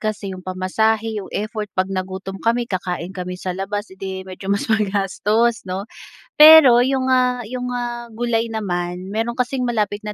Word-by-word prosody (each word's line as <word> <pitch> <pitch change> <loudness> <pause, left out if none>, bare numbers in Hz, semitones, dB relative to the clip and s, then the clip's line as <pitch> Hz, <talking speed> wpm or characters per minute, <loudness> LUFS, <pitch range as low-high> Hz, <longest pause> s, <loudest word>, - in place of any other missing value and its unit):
kasi 215 -2 -3
yung 185 - -8
pamasahe, 215 +4 0
yung 190 - -10
effort, 215 0 -4
'pag 185 0 +2
nagutom 190 +1 -5
kami 235 +1 +1
kakain 180 -2 -4
kami 180 -1 -5
sa 185 0 -3
labas, 205 +2 -4
edi 190 0 -6
medyo 190 +1 -8
mas 200 +1 0
magastos 210 +2 +1
'no. 190 +2 -3 0.5
Pero 305 -5 +9
yung, 260 0 0
ah, 250 -1 +2
yung, 250 +1 -4
ah, 240 -1 -4
gulay 230 0 -1
naman, 180 -3 -3
meron 225 +3 -2
kasing 250 +1 0
malapit 210 -3 -1
na 210 - -4
210 Hz, 165 wpm, -20 LUFS, 190-235 Hz, 0.5 s, Pero